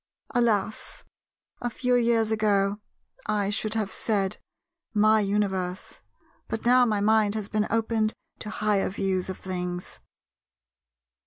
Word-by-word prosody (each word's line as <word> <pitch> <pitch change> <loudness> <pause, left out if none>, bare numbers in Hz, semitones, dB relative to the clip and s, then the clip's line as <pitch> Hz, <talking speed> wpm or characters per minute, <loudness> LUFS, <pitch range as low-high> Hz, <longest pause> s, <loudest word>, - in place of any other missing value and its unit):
Alas, 220 -4 0 0.6
a 240 - -1
few 250 +1 -1
years 230 -2 +3
ago, 205 -2 +2 0.5
I 205 -2 0
should 215 +1 -2
have 215 -3 -1
said 200 -4 0 0.6
"my 215 +1 +5
universe:" 195 -2 -2 0.5
but 225 - -4
now 250 0 +6
my 210 -2 0
mind 215 0 +3
has 215 -1 -3
been 215 -1 0
opened 225 -1 0 0.2
to 210 - -6
higher 210 -2 +1
views 190 -1 -1
of 190 - -4
things. 180 -1 -5
210 Hz, 125 wpm, -26 LUFS, 195-220 Hz, 0.6 s, now